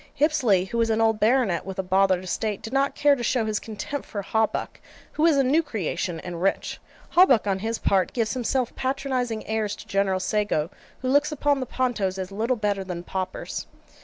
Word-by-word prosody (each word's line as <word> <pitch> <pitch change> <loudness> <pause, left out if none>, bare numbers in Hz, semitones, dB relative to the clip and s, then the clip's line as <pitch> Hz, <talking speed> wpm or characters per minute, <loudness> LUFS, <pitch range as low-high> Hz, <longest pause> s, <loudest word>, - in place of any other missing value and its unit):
Hipsley, 255 - +3
who 235 - 0
is 230 - +1
an 220 0 +1
old 225 -1 +2
baronet, 220 -6 +2
with 190 0 -7
a 190 - -1
bothered 185 0 +2
estate, 210 +3 -2
did 225 +3 -7
not 275 +1 +1
care 290 -1 +4
to 250 - -6
show 240 -1 +1
his 215 -1 -1
contempt 225 +6 -6
for 205 -3 -5
Hawbuck, 220 +2 -1 0.3
who 310 +2 +2
is 310 -4 +4
a 275 - +4
new 285 +6 +3
creation, 190 - -3
and 175 -2 -6
rich. 195 - 0 0.3
Hawbuck, 305 - +5
on 195 -2 0
his 225 +3 -2
part, 190 -2 +1
gives 225 -4 -1
himself 250 0 -1
patronizing 260 -4 -2
airs 215 -2 -1
to - - -12
General 195 -1 +1
Sago, 195 -5 0 0.3
who - - -1
looks 290 +3 +3
upon 290 -1 +1
the 255 - -3
Pontos 230 -8 -1
as 190 0 -5
little 225 +5 0
better 205 -2 -1
than 180 -2 -6
paupers. 185 0 -4
220 Hz, 200 wpm, -25 LUFS, 195-255 Hz, 0.3 s, Hawbuck